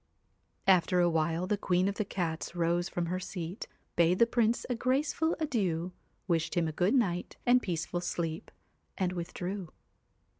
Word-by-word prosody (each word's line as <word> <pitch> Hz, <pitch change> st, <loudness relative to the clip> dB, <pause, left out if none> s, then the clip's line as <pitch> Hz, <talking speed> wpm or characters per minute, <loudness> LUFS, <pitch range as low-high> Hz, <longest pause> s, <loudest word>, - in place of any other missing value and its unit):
After 180 Hz, -1 st, +4 dB
a 175 Hz, -1 st, +4 dB
while 165 Hz, +2 st, +1 dB
the 205 Hz, +1 st, 0 dB
Queen 180 Hz, 0 st, +2 dB
of 200 Hz, -, 0 dB
the 210 Hz, +1 st, -2 dB
Cats 170 Hz, -3 st, -3 dB
rose 175 Hz, +1 st, +1 dB
from 175 Hz, -, -2 dB
her 180 Hz, +2 st, -2 dB
seat, 185 Hz, 0 st, -5 dB, 0.3 s
bade 170 Hz, +1 st, +4 dB
the 235 Hz, -, +6 dB
Prince 235 Hz, 0 st, +1 dB
a 250 Hz, -, 0 dB
graceful 280 Hz, +7 st, +1 dB
adieu, 190 Hz, -, 0 dB, 0.4 s
wished 165 Hz, -1 st, 0 dB
him 170 Hz, -2 st, +2 dB
a -, -, -2 dB
good 180 Hz, -, +2 dB
night 180 Hz, -8 st, 0 dB
and 250 Hz, 0 st, +5 dB
peaceful 175 Hz, -2 st, -2 dB
sleep, 165 Hz, -2 st, -3 dB, 0.5 s
and 185 Hz, -2 st, +1 dB
with 175 Hz, -1 st, -4 dB
drew. 185 Hz, -1 st, -4 dB
180 Hz, 165 wpm, -31 LUFS, 170-205 Hz, 0.5 s, the